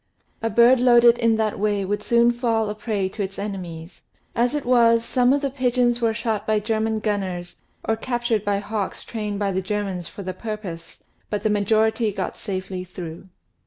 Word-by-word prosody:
A 225 - 0
bird 235 +4 +5
loaded 240 -1 +6
in 230 -1 +3
that 220 -2 -1
way 205 -1 0
would 205 +2 -2
soon 235 0 +4
fall 230 -3 0
a - - -3
prey 210 -3 -2
to 205 - -6
its 195 0 -4
enemies. 180 -4 -6 0.3
As 245 +4 +1
it 295 - -2
was, 230 -2 +4
some 250 0 +3
of 285 +1 +2
the 275 -2 -1
pigeons 245 -2 +1
were 230 -1 +3
shot 220 -1 -2
by 215 -1 +2
German 220 +1 -1
gunners 190 -5 -3 0.3
or 225 - +2
captured 240 -3 -1
by 205 -1 +1
hawks 205 -1 -3
trained 210 -3 -4
by 200 -1 0
the 190 0 -1
Germans 190 -3 -3
for 200 - -9
the 185 0 -4
purpose, 185 -6 -7 0.3
but 210 - -2
the 215 - +2
great 210 0 +2
majority 220 +2 +2
got 195 -1 -4
safely 185 -2 -4
through. 180 -1 -8
215 Hz, 195 wpm, -23 LUFS, 195-235 Hz, 0.3 s, loaded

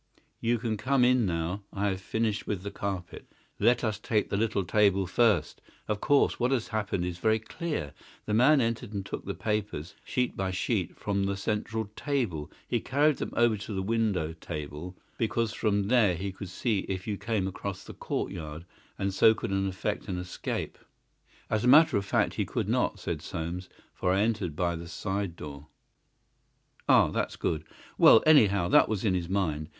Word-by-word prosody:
You 120 +1 +1
can 110 -1 -2
come 130 +2 +2
in 125 -3 +3
now. 85 +3 -2
I 100 +1 0
have 95 -1 -3
finished 110 +1 -1
with 95 -3 -2
the 100 - -5
carpet. 95 -3 -5 0.3
Let 120 +3 +3
us 110 -3 -1
take 110 -1 0
the - - +1
little 105 -2 +1
table 100 +1 +3
first. 95 -4 +2 0.3
Of 105 -1 -2
course, 145 -1 +3
what 120 0 +2
has 130 -4 0
happened 100 -4 -1
is 90 -1 -4
very 110 +2 +3
clear. 110 - -4 0.3
The 105 - -2
man 135 +6 +5
entered 115 -1 -2
and 100 -2 -3
took - - -6
the - - -4
papers, 105 -6 -3
sheet 125 -1 -1
by 95 -1 -1
sheet, 95 - -1
from 100 -1 -1
the 100 0 -1
central 110 +2 -2
table. 120 - -2 0.2
He - - 0
carried 145 +1 +2
them - - -4
over 120 -2 +4
to 100 +2 -6
the 95 - -1
window 100 -7 0
table, 75 +2 -7 0.2
because 115 -1 0
from 100 -2 0
there 110 -6 +4
he 95 +3 -4
could 95 0 -8
see 105 +3 0
if 95 -2 -3
you 105 - -2
came 105 -2 -1
across 95 0 -5
the - - -10
courtyard, 80 -3 -4 0.3
and 100 0 -1
so 110 +3 +6
could 110 -1 -4
effect 95 +2 -2
an 95 -3 -3
escape." 90 0 -4 0.7
"As 110 - 0
a - - +2
matter 155 +5 +7
of 100 -1 0
fact - - +1
he - - 0
could - - -2
not," - - +1
said - - -3
Soames, 85 +3 -5 0.2
"for 90 - 0
I 95 +2 +3
entered 105 -8 0
by 85 +1 0
the 85 +1 -7
side 95 +1 -3
door." 75 -2 -9 1.2
"Ah, - - +6
that's - - -2
good! 80 -2 -2 0.4
Well, 110 - +8
anyhow, 105 - +5
that - - +5
was 110 -1 -1
in 100 - +3
his 90 -2 -2
mind. 80 -6 -1
100 Hz, 185 wpm, -28 LUFS, 90-115 Hz, 1.2 s, Well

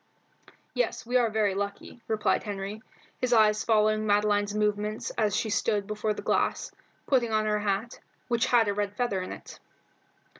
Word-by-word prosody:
"Yes, - - -1
we 245 +2 -3
are 240 -2 +3
very 210 -2 +1
lucky," 200 +4 -5
replied 215 -1 +1
Henry, 205 +1 -5 0.4
his 250 -1 +1
eyes 215 -2 +4
following 215 -1 +2
Madeline's 205 0 +2
movements 210 0 -1
as 210 -3 0
she 220 0 -1
stood 205 -1 0
before 215 +1 -2
the - - -7
glass, - - 0 0.3
putting 245 -4 +2
on 215 0 +1
her 210 0 +1
hat, 205 +3 -2 0.3
which 235 -2 +1
had 235 -3 +4
a 205 - +1
red 205 0 -3
feather 225 -7 0
in 185 - -6
it. - - -10
215 Hz, 165 wpm, -28 LUFS, 205-225 Hz, 0.4 s, eyes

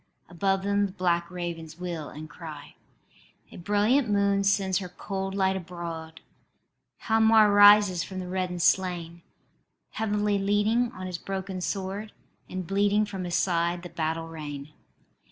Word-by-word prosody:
Above 190 +2 0
them 200 0 +1
the - - -10
black 175 -2 0
ravens 170 -3 -6
wheel 170 -4 -5
and 155 +1 -9
cry. 155 -2 -10 0.8
A - - -11
brilliant 210 +7 +2
moon 200 -1 +2
sends 195 -2 +2
her 185 -2 -6
cold 195 +1 -5
light 190 -1 +2
abroad: 170 -3 -7 0.8
Hialmar 220 -1 +5
arises 205 -3 +7
from 190 - -8
the 185 -1 -4
reddened 180 -1 -2
slain, 175 -3 +1 0.7
Heavily 210 -1 0
leaning 210 +4 +1
on 185 - -7
his 180 -2 -5
broken 190 0 -5
sword, 195 +3 -4 0.4
And 185 -1 -4
bleeding 205 +3 +2
from 195 -3 -5
his 175 -1 -2
side 170 -1 0
the 175 - -7
battle 165 0 -2
rain. 150 -2 -8
185 Hz, 140 wpm, -27 LUFS, 170-205 Hz, 0.8 s, arises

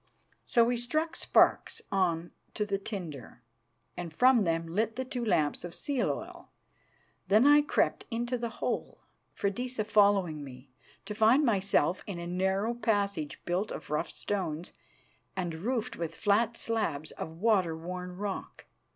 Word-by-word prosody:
So 235 - +5
we 240 +1 +1
struck 310 +7 0
sparks - - +3
on 175 -3 +1 0.2
to 210 - 0
the 200 -1 -1
tinder, 160 - -7 0.5
and 175 -2 -5
from 245 +4 +5
them 165 0 0
lit 215 +7 -1
the 260 +1 -3
two 250 -1 -4
lamps 155 -10 +1
of 175 -1 -6
seal 280 -5 0
oil. - - -6 0.8
Then 210 +6 +5
I 290 +1 +7
crept 295 - 0
into 240 +2 -1
the 235 -1 -3 0.2
hole, - - -3 0.3
Freydisa 245 +3 -1
following 200 -8 +3
me, 130 -1 -12 0.3
to 210 - -4
find 225 +7 +4
myself 195 - +2
in 195 -4 -4
a 170 - -5
narrow 190 +5 0
passage 200 -9 -1
built 180 +4 0
of - - -7
rough 150 +3 0
stones 180 -5 -3 0.6
and 175 -3 -2
roofed 220 +8 -2
with 165 -1 -4
flat 220 +3 +2
slabs 165 -10 -2
of 160 0 -7
water 185 -5 +2
worn 180 +2 -6
rock. 200 0 -5
200 Hz, 150 wpm, -30 LUFS, 170-230 Hz, 0.8 s, I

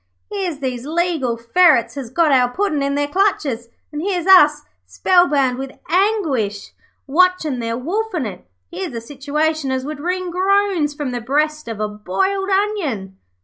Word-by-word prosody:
'Here's 375 -7 -3
these 250 -3 -3
legal 320 -7 0
ferrets 260 +3 +3
has 270 -5 -6
got 315 +4 +2
our 250 -2 +4
Puddin' 310 0 -1
in 280 0 0
their 290 0 0
clutches, 290 - 0 0.2
and 300 0 -4
here's 360 -2 -1
us, 300 -6 +6 0.2
spellbound 290 -9 +2
with 270 0 -7
anguish, 320 - 0 0.3
watchin' 320 -3 +2
them 230 +2 -4
wolfin' 385 - -2
it. 190 - -8 0.2
Here's 190 +7 -5
a - - -2
situation 290 +3 -2
as 260 0 -2
would 300 0 -6
wring 360 +3 -2
groans 375 -4 +1
from 285 -3 -3
the 245 -1 -4
breast 300 +4 -1
of 225 -2 -5
a 215 - 0
boiled 380 - -2
onion.' 335 - -1
295 Hz, 155 wpm, -19 LUFS, 250-365 Hz, 0.3 s, us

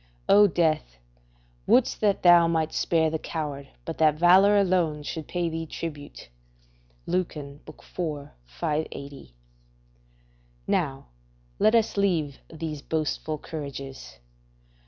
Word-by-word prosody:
["O 205 +1 +7
death! 155 - 0 0.7
wouldst 250 -1 +3
that 205 -2 +1
thou 175 -1 +7
might 160 -1 0
spare 160 -2 +1
the 160 - -2
coward, 145 -4 -5 0.2
but 165 - -6
that 155 -2 +4
valour 185 +5 +6
alone 175 -6 +1
should 155 +1 -6
pay 175 -1 -1
thee 165 0 -4
tribute." 150 - -7 0.8
Lucan, 150 -6 -3
iv. 155 - -10 0.7
580.] 140 - -5 1.3
Now, 135 - -1 0.5
let 215 - +4
us 225 -2 +1
leave 165 -8 0
these 155 -2 -5
boastful 155 0 -2
courages. 140 -3 -8
160 Hz, 110 wpm, -26 LUFS, 145-175 Hz, 1.3 s, O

